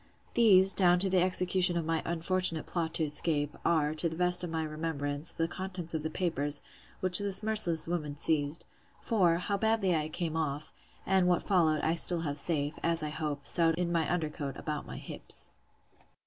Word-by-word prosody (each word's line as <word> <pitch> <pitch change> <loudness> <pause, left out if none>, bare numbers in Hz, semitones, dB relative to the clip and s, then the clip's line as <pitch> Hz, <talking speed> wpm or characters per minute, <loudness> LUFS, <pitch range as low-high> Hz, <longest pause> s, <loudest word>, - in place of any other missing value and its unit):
These, 195 -5 +5
down 180 -2 +4
to 190 +1 0
the 185 -1 +3
execution 180 -1 +4
of 165 - -3
my 165 0 -1
unfortunate 170 -1 -1
plot 165 -2 -4
to 160 - +1
escape, 150 -1 -1
are, 155 -2 +1
to 160 +2 -2
the 160 - -8
best 180 +1 +2
of 175 - -4
my 160 0 -3
remembrance, 155 -1 -3
the 165 - -2
contents 180 -2 -6
of 160 - -2
the 160 - -4
papers, 145 -4 -2 0.4
which 185 0 +6
this 200 0 +5
merciless 210 -8 +2
woman 155 -4 -4
seized: 150 +1 -1 0.4
For, 185 -8 +2
how 200 +3 -3
badly 220 -5 +1
I 155 -1 -2
came 160 0 -4
off, 150 -2 -4 0.3
and 190 -2 +2
what 175 -1 +1
followed, 165 -6 +1
I 160 - 0
still 170 0 +3
have 145 -2 -3
safe, 145 -1 0
as 165 -1 -1
I 150 - -3
hope, 150 -2 -5
sewed 165 -2 +3
in 175 0 -2
my 165 -2 -1
under 165 -4 -2
coat, 140 -3 -6
about 150 -1 -5
my - - -8
hips. - - -6
165 Hz, 190 wpm, -29 LUFS, 155-180 Hz, 0.4 s, which